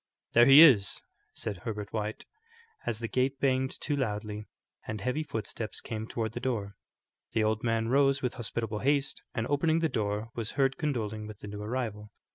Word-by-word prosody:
"There 120 +1 +7
he 140 +4 +11
is," 105 - +6 0.4
said 100 - -3
Herbert 105 +1 -5
White, 110 0 -3 0.6
as 110 - 0
the 115 +1 -3
gate 130 +3 0
banged 130 -1 +1
to 145 - 0
loudly 105 -4 -3 0.4
and 110 -1 -3
heavy 125 +9 -1
footsteps 110 -5 -5
came 110 -1 -5
toward 110 -2 -2
the 120 - -5
door. 110 -6 -2 0.6
The 110 - +2
old 110 0 0
man 115 -1 +1
rose 135 +1 +4
with 125 - 0
hospitable 115 -2 -3
haste, 140 +2 +1
and 115 - 0
opening 155 +4 +2
the 165 -1 +1
door, 105 0 -2
was 115 -2 -4
heard 135 -1 +2
condoling 110 -8 -2
with 110 -1 -10
the - - -7
new 105 0 -6
arrival. 105 -2 -3
115 Hz, 180 wpm, -30 LUFS, 105-135 Hz, 0.6 s, he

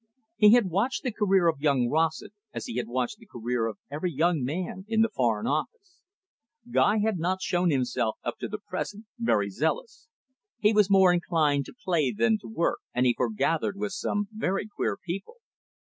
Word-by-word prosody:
He 210 -5 +7
had 235 -7 +4
watched 210 +9 0
the 255 - -1
career 195 -4 +3
of 160 -4 0
young 140 -5 +2
Rossett, 160 - 0 0.2
as - - -4
he 115 - -5
had 120 -2 -2
watched 125 - -2
the 225 - -17
career 120 -3 -2
of 110 -3 -6
every 155 +5 -2
young 160 0 +1
man 180 +7 -3
in 220 0 +2
the 225 - +1
Foreign 115 -4 +1
Office. 360 - -3 0.7
Guy 215 -2 +3
had 215 -5 0
not 185 +3 -1
shown 175 0 +1
himself, 125 -5 0
up - - -4
to - - -3
the - - -5
present, 210 +2 -6
very 105 - +1
zealous. 455 - -2 0.5
He 215 -1 +3
was 210 -2 +4
more 190 -2 +6
inclined 155 -5 +1
to - - -12
play 160 -8 +2
than 220 0 +2
to - - -11
work, 195 -6 -1 0.2
and 125 +1 +2
he 125 - +4
foregathered 155 - 0
with 205 0 -3
some 205 +2 -2
very 210 -2 -2
queer 205 - -2
people. 190 - -6
175 Hz, 190 wpm, -27 LUFS, 140-210 Hz, 0.7 s, He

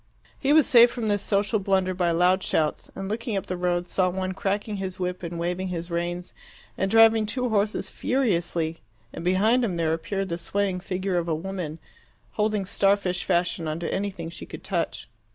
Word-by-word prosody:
He 275 - +1
was 310 0 +6
saved 240 -3 +7
from 230 -3 -2
this 205 -1 +1
social 205 +1 +1
blunder 190 -1 +1
by 180 -1 +1
loud 180 +3 +3
shouts, 155 -4 0
and 195 - -5
looking 220 0 -2
up 195 - -3
the 185 - -3
road 175 0 0
saw 185 0 +1
one 185 +1 -2
cracking 200 +2 -2
his 190 -1 -5
whip 180 0 -2
and 170 -1 -5
waving 180 +2 -2
his 170 -1 -5
reins 175 +1 -3 0.4
and 190 - 0
driving 225 0 +6
two 250 +2 -1
horses 210 -1 0
furiously, 175 -10 0 0.3
and 165 - -6
behind 210 +8 +3
him 200 -7 0
there 160 -1 +1
appeared 195 +4 -3
the 170 0 -3
swaying 195 +1 -1
figure 185 0 -2
of 170 - -4
a 160 - +1
woman, 170 -2 -5 0.5
holding 210 -2 0
star 200 +1 +3
fish 180 -3 -2
fashion 175 -2 0
on 155 +1 -2
to 170 - -3
anything 190 -4 -3
she 170 - -9
could - - -9
touch. - - -2
185 Hz, 195 wpm, -25 LUFS, 175-205 Hz, 0.5 s, saved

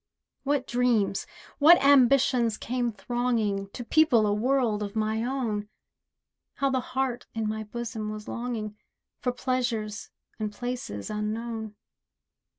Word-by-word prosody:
What 275 -1 0
dreams, 240 -6 +1 0.3
what 325 +4 +9
ambitions 260 -4 +4
came 245 0 -1
thronging 215 -2 -1
To 245 - -7
people 245 -4 +4
a 205 - +2
world 235 -1 +1
of 205 0 -4
my 220 +1 0
own! 230 -5 -2 0.9
How 275 -1 +1
the 260 - +2
heart 255 -1 -2
in 220 -1 -1
my 220 0 -2
bosom 220 -1 -4
was 215 0 -7
longing, 225 -3 -4 0.4
For 250 - 0
pleasures 240 -4 -2 0.3
and 215 -1 -2
places 240 - -5
unknown. 220 +1 -3
235 Hz, 125 wpm, -27 LUFS, 215-250 Hz, 0.9 s, what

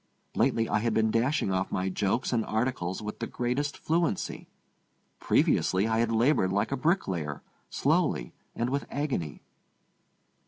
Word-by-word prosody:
Lately 115 0 +2
I - - +1
had 115 0 0
been 110 0 +3
dashing 120 -1 +1
off 95 0 -1
my 95 +1 -1
jokes 100 +7 0
and 115 -2 +2
articles 110 -4 -2
with 105 - -6
the 115 - -3
greatest 130 +4 -2
fluency. 165 - -1 0.7
Previously 95 +3 +2
I 110 0 +1
had 115 0 +1
labored 115 -4 +3
like 100 +1 0
a - - +1
bricklayer, 95 - -1 0.3
slowly - - +1 0.2
and 120 +2 -1
with 140 +1 -2
agony. 130 - -3
115 Hz, 145 wpm, -28 LUFS, 95-130 Hz, 0.7 s, been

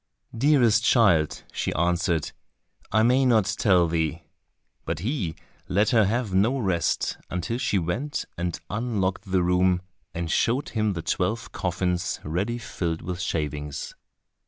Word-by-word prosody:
"Dearest 120 -4 +4
child," 95 - +3
she - - -1
answered, 85 -1 +1 0.6
"I 110 +2 +4
may 125 +3 +4
not 115 -6 +4
tell 90 -5 +4
thee." 80 0 -1 0.6
But - - -3
he 100 - -2 0.3
let 100 +4 +2
her 110 -4 +5
have 110 0 -1
no 110 +8 +3
rest 95 -8 0
until 90 +7 -3
she 105 - +1
went 110 - -2
and 85 -1 -3
unlocked 100 -4 -2
the 95 -1 +3
room, 90 0 +2 0.3
and 85 -1 -2
showed 125 +5 +1
him 110 -2 0
the 85 -2 -5
twelve 110 +5 -1
coffins 90 -1 -1
ready 95 +10 -2
filled 85 -7 -4
with 90 +2 -4
shavings. 75 -4 -3
95 Hz, 135 wpm, -25 LUFS, 85-115 Hz, 0.6 s, her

